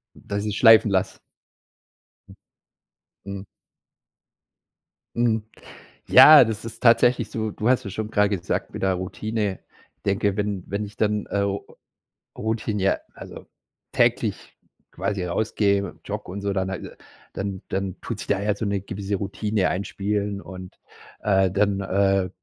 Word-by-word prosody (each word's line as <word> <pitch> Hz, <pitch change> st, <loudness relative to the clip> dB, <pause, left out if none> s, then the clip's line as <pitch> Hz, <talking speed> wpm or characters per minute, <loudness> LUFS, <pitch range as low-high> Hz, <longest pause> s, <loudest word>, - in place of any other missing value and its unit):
Dass 100 Hz, +1 st, -4 dB
ich's 105 Hz, -1 st, -2 dB
schleifen 115 Hz, -2 st, +7 dB
lasse? 95 Hz, -1 st, 0 dB, 1.1 s
Hm. -, -, -15 dB, 0.9 s
Mhm. 100 Hz, 0 st, -7 dB, 1.7 s
Mhm, 115 Hz, -2 st, +1 dB, 0.6 s
ja, 150 Hz, -4 st, +9 dB
das 110 Hz, -1 st, -4 dB
ist 115 Hz, 0 st, -8 dB
tatsächlich 120 Hz, +1 st, +4 dB
so. 110 Hz, -1 st, -3 dB
Du 110 Hz, +3 st, -2 dB
hast 130 Hz, -1 st, +2 dB
ja 100 Hz, -, -5 dB
schon 110 Hz, +2 st, -4 dB
gerade 105 Hz, -2 st, +2 dB
gesagt, 85 Hz, -, -3 dB
mit -, -, -7 dB
der 95 Hz, -1 st, +2 dB
Routine. 100 Hz, +2 st, -3 dB, 0.4 s
Ich -, -, -48 dB
denke, 100 Hz, 0 st, 0 dB
wenn 100 Hz, -3 st, -2 dB
wenn 100 Hz, +2 st, -3 dB
ich 105 Hz, 0 st, -11 dB
dann, 105 Hz, -1 st, 0 dB
äh, 100 Hz, 0 st, -1 dB, 0.9 s
routinie 110 Hz, -3 st, -1 dB, 0.2 s
also, -, -, -11 dB, 0.4 s
täglich -, -, 0 dB, 0.4 s
quasi 100 Hz, -3 st, -3 dB
rausgehe, 100 Hz, 0 st, 0 dB
jogge -, -, -5 dB
und 100 Hz, +1 st, -6 dB
so, 100 Hz, -1 st, -1 dB
dann 95 Hz, 0 st, -1 dB
al 95 Hz, -, -7 dB, 0.4 s
dann 95 Hz, -1 st, -4 dB
dann 95 Hz, -1 st, -3 dB
tut 110 Hz, -3 st, -5 dB
sich -, -, -7 dB
da 100 Hz, -1 st, +1 dB
ja 105 Hz, 0 st, +1 dB
so 110 Hz, -, -4 dB
‘ne 100 Hz, -1 st, -1 dB
gewisse 100 Hz, 0 st, -4 dB
Routine 100 Hz, 0 st, -1 dB
einspielen 100 Hz, +1 st, -2 dB
und, 95 Hz, -1 st, -11 dB, 0.4 s
äh, 95 Hz, -2 st, +3 dB
dann, 100 Hz, +1 st, +1 dB
äh, 95 Hz, -1 st, +1 dB
100 Hz, 140 wpm, -24 LUFS, 95-105 Hz, 1.7 s, ja